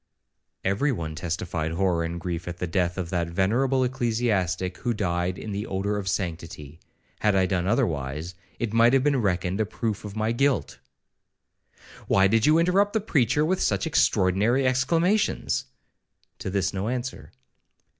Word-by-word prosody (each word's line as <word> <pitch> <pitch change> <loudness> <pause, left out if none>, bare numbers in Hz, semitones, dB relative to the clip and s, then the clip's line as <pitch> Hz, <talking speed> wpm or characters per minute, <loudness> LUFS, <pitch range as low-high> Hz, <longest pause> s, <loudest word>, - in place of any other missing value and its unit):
'—'Every 100 +10 +1
one 80 -9 -4
testified 80 0 -3
horror 90 -2 +1
and 85 +1 -4
grief 85 0 -4
at 90 0 -5
the 90 - -2
death 90 0 -1
of 90 -3 -4
that 85 -2 0
venerable 120 +10 +1
ecclesiastic, 110 -8 -1
who 120 -1 -1
died 90 -2 -1
in 110 - -6
the 100 +2 -3
odour 100 +2 -1
of 100 -2 -4
sanctity. 80 -5 -4 0.4
Had 105 -2 +2
I 95 -1 +4
done 90 -1 -1
otherwise, 80 - -1 0.2
it 115 -2 -3
might 115 +2 +5
have 135 -1 +4
been 140 -3 +2
reckoned 95 0 0
a - - +1
proof 110 -1 -3
of 105 -1 -7
my 110 +1 0
guilt.' 130 - 0 1.3
'Why 95 - +4
did 110 +4 +3
you 155 +1 +5
interrupt 190 +4 +3
the 220 - +2
preacher 150 - +1
with 185 +3 0
such - - +1
extraordinary 110 - +2
exclamations?'—To 165 - -1
this 95 -1 0
no 95 +2 -2
answer. 125 +1 -4
100 Hz, 155 wpm, -25 LUFS, 90-125 Hz, 1.3 s, might